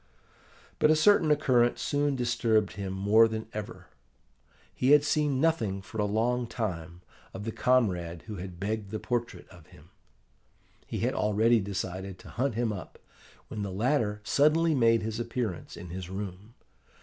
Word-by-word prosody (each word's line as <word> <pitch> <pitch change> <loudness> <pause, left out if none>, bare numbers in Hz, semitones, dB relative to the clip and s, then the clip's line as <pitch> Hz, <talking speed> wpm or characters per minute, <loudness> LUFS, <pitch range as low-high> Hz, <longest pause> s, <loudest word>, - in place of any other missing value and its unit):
But 150 - +4
a 155 - +6
certain 165 0 +4
occurrence 130 -5 +3
soon 145 -1 0
disturbed 115 -4 +1
him 100 -2 -5
more 100 +4 +4
than 110 0 -4
ever. 105 -1 -7 0.9
He 130 +3 +3
had 150 -1 +6
seen 150 -2 +1
nothing 130 -11 +1
for 110 - -8
a 105 - +2
long 120 +4 0
time 90 -7 -4 0.3
of 95 - -6
the 115 - -3
comrade 90 -11 +1
who 105 -2 -7
had 90 -1 -8
begged 105 +1 -3
the 110 - -3
portrait 120 +1 -3
of 90 -4 -16
him. 75 +5 -18 1.0
He - - -4
had - - +1
already 110 +3 +3
decided 95 -1 -4
to - - -13
hunt 130 -1 -1
him 115 -2 0
up, 90 -4 -9 0.5
when 105 - -6
the 100 - -3
latter 105 0 0
suddenly 155 +6 +3
made 115 -4 +3
his 110 +1 -3
appearance 115 -6 -4
in 90 0 -9
his 90 0 -6
room. 100 +3 -7
110 Hz, 160 wpm, -28 LUFS, 95-125 Hz, 1.0 s, a